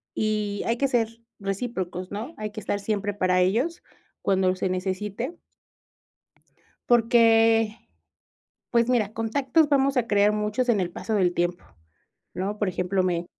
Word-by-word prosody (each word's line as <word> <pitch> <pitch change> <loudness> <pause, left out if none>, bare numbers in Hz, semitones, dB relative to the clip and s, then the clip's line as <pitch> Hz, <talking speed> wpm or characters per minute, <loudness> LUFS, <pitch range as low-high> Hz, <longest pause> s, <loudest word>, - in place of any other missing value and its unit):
y 210 -1 -1
hay 230 +1 0
que 275 - +2
ser 230 -2 -1 0.2
recíprocos, 190 -3 -4
¿no? 225 +10 -5
Hay 215 0 -4
que 215 - -7
estar 200 0 -2
siempre 205 0 -2
para 185 -2 +1
ellos 245 - 0 0.4
cuando 185 -1 +2
se 185 - -1
necesite 200 - -3 1.5
porque, 225 -2 +4 0.9
pues 235 0 +2
mira, 220 -5 +1
contactos 265 +7 +1
vamos 275 -1 +2
a 240 -2 +2
crear 205 0 +3
muchos 210 +4 -1
en 215 -5 +3
el 175 -1 -1
paso 220 - -4
del 180 -4 +2
tiempo, 175 0 -1 0.7
¿no? 200 +3 -3
Por 205 - 0
ejemplo, 185 +1 0
me 175 -1 -1
210 Hz, 145 wpm, -25 LUFS, 190-235 Hz, 1.5 s, porque